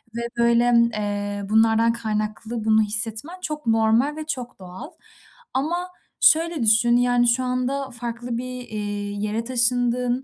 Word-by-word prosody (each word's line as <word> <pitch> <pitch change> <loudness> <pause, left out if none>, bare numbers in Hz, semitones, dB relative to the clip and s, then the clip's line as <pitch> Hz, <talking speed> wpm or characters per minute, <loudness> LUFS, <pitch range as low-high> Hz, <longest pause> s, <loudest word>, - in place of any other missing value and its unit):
ve, 235 - -3 0.2
böyle, 235 0 +3 0.3
eee, 205 -1 -3
bunlardan 225 +1 +3
kaynaklı 215 0 -4
bunu 220 0 +4
hissetmen 225 - -3
çok 300 -6 -5
normal 225 +6 +2
ve 310 - -6
çok 250 -8 -5
doğal 185 - -9 0.6
ama 345 +7 -2 0.3
şöyle 325 -4 +3
düşün, 230 +2 +4
yani, 245 0 +2
şu 245 +2 +2
anda 255 +2 -2
farklı 235 0 -5
bir, 250 0 -6
eee, 215 -1 -5 0.4
yere 210 +2 -2
taşındın, 245 +1 +1
235 Hz, 135 wpm, -23 LUFS, 220-255 Hz, 0.6 s, bunu